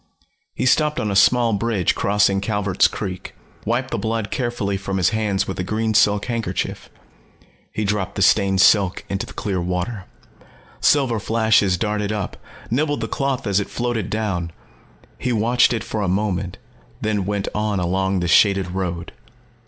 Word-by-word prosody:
He - - -1
stopped 150 +3 +2
on 105 - -1
a - - -1
small 115 +3 +4
bridge 105 -4 +1
crossing 100 -1 +2
Calvert's 100 -2 +2
Creek, 95 -3 -6 0.3
wiped 125 +4 -1
the - - -1
blood 110 -1 -2
carefully 120 -6 -2
from 95 0 -3
his 90 -3 +3
hands 105 -3 -1
with 95 - -5
a - - 0
green 110 +3 -1
silk 105 -1 +3
handkerchief. 115 -2 -3 0.8
He 105 - -2
dropped 100 -2 -2
the 100 - +1
stained 95 -1 +3
silk 95 -2 +3
into 100 0 -3
the - - -11
clear 95 -3 -2
water. 90 +4 -3 0.7
Silver 130 -6 +3
flashes 110 -3 +2
darted 105 0 -1
up, 105 -3 -3 0.4
nibbled 145 +4 0
the - - -2
cloth 135 -2 -2
as 100 -2 +2
it 100 - -4
floated 120 -4 -2
down. 95 -6 -2 0.7
He 125 - -1
watched 120 +2 +3
it 115 -3 -1
for 110 - -3
a 100 - 0
moment, 95 -1 -1 0.4
then 105 -3 -1
went 100 -1 -2
on 105 -2 -1
along 95 +1 0
the 85 - -1
shaded 95 0 +4
road. 90 -2 -4
105 Hz, 165 wpm, -21 LUFS, 95-115 Hz, 0.8 s, small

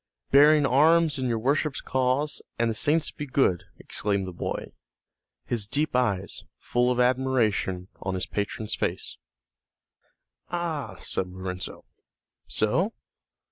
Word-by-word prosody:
"Bearing 145 +1 +7
arms 155 +2 +4
in 130 - 0
your 115 -2 0
worship's 140 +4 0
cause, 130 +3 0 0.2
an' 115 0 +2
the - - 0
saints 150 +8 +2
be 150 - -6
good!" 130 - +2
exclaimed 100 -2 -1
the 90 - -6
boy, - - -4 0.7
his 105 - -1
deep 145 +3 0
eyes, 100 -7 0
full 125 0 +1
of 125 0 0
admiration, 125 -8 +1
on 95 0 -2
his 95 - -2
patron's 105 +1 -3
face. - - -2 1.3
"Ah," 160 - -3
said 95 - -1
Lorenzo, 90 0 -6 0.6
"so? 170 - +1
125 Hz, 125 wpm, -26 LUFS, 100-145 Hz, 1.3 s, Bearing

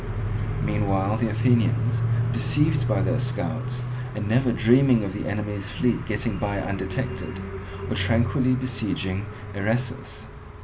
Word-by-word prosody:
Meanwhile 100 -2 +1
the 115 -1 +1
Athenians, 115 0 +2 0.3
deceived 130 +2 +2
by 110 - +2
their 125 -1 +1
scouts, 125 0 -2 0.3
and 105 -1 -3
never 125 +3 +3
dreaming 120 0 +5
of 95 -2 -3
the 105 - -4
enemy's 105 -1 -3
fleet 115 +3 0
getting 110 -2 -1
by 100 -1 -1
undetected, 95 -1 -3 0.5
were - - -2
tranquilly 115 +5 +2
besieging 105 -5 -2 0.3
Eresus. 120 +6 -2
115 Hz, 120 wpm, -25 LUFS, 105-125 Hz, 0.5 s, dreaming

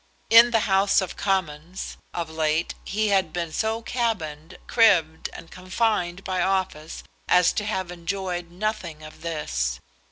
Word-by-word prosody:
In 230 +1 +9
the 225 -2 +2
House 195 -1 +3
of 190 -2 -3
Commons, 180 -3 -2 0.2
of 170 -2 -3
late 160 0 0
he 215 +1 0
had 190 -5 +2
been 170 -1 -3
so 220 +6 -1
cabined, 185 -10 -3
cribbed, 180 -9 +3
and 165 - -11
confined 185 -1 -1
by 185 -1 -1
office 185 -5 -2 0.2
as 180 -1 +4
to 210 - -1
have 190 -4 -2
enjoyed 180 0 -4
nothing 180 -4 -4
of 155 - -12
this. - - -2
180 Hz, 140 wpm, -24 LUFS, 160-200 Hz, 0.2 s, In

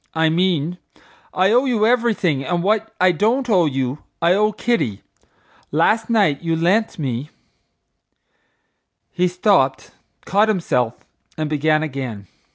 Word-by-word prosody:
—I 160 0 +2
mean, 175 0 0 0.5
I 190 +2 +2
owe 250 +4 +3
you 230 -5 +1
everything, 220 - +1
and 170 +4 -2
what 215 +2 0
I 185 0 +4
don't 230 - 0
owe 185 -8 +3
you, 135 0 -2 0.2
I 170 +1 +3
owe 210 +2 +2
Kitty. 190 - -2 0.7
Last 215 +10 +1
night 200 -12 +2
you 165 -1 -1
lent 195 +7 +1
me—" 135 -2 -4 1.8
He 180 0 +1
stopped, 180 -7 +1 0.3
caught 205 +3 +2
himself, 125 - -1 0.3
and 155 -1 -2
began 155 +1 +1
again. 130 -9 -5
175 Hz, 130 wpm, -20 LUFS, 150-215 Hz, 1.8 s, I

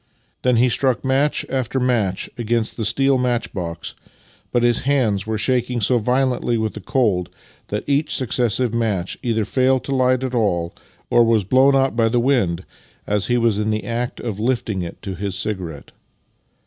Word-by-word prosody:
Then 125 -1 +2
he 120 +2 +4
struck 130 0 +1
match 135 +3 +1
after 130 0 -1
match 115 -7 0
against 115 -1 -1
the 110 - -2
steel 135 +4 +3
match 125 -1 -1
box, 85 -3 -5 0.6
but 120 - +1
his 120 -1 +2
hands 120 -8 +1
were 110 0 -1
shaking 125 +2 0
so 120 +3 +2
violently 125 0 +1
with 110 -1 -1
the 105 - -8
cold 100 -6 0 0.4
that 105 - -3
each 145 +2 +1
successive 125 -1 0
match 105 -6 -1
either 115 -3 0
failed 130 +1 +2
to 135 0 -2
light 130 0 +2
at 130 -1 -3
all 90 -8 0 0.4
or 120 - +6
was 115 -2 +3
blown 130 +7 +4
out 135 -2 +2
by 115 -1 +3
the 120 +1 +1
wind 110 -9 +1 0.4
as 105 -1 0
he 120 - +2
was 115 -3 +2
in 105 0 0
the 105 0 -1
act 120 +1 -3
of 110 -4 -4
lifting 115 -4 -1
it 85 - -7
to 95 - -4
his 95 +1 -4
cigarette. 90 -8 -5
120 Hz, 180 wpm, -21 LUFS, 105-130 Hz, 0.6 s, or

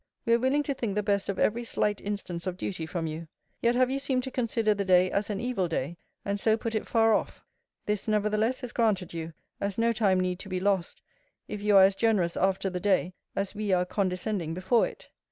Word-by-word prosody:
We 230 - +3
are 235 - +4
willing 265 +4 +2
to 285 - -1
think 230 -6 -3
the 210 - 0
best 200 -1 0
of 195 - -1
every 235 +3 +1
slight 210 -3 -1
instance 195 -4 -4
of 180 -1 -3
duty 170 -4 -4
from 170 -1 -3
you. 160 +1 -5 0.3
Yet 235 +1 +3
have 255 +1 +3
you 275 - 0
seemed 265 -2 0
to 265 - -5
consider 230 -3 +1
the 200 -1 -2
day 185 -1 +4
as 200 +1 -1
an 200 -2 -2
evil 240 -7 -1
day, 165 0 -2 0.3
and 200 0 -1
so 220 +2 +3
put 225 0 -4
if 220 - -2
far 225 -1 +4
off. - - -2 0.4
This 210 0 -1
nevertheless 215 +4 +1
is 245 - -5
granted 200 -7 +1
you, 165 0 -5 0.3
as 200 -1 -3
no 230 0 +2
time 200 -4 +2
need 180 0 -1
to 200 - -8
be 185 -1 -1
lost, 190 -2 -1 0.4
if 210 -1 -5
you 205 -1 +4
are 190 - +9
as 195 +1 +5
generous 195 -6 +1
after 195 +1 +1
the 180 -1 -2
day, 185 -1 +1 0.2
as 195 0 -2
we 210 -1 -2
are 180 0 +3
condescending 180 -2 -2
before 190 +6 +2
it. - - -13
200 Hz, 230 wpm, -28 LUFS, 185-225 Hz, 0.4 s, are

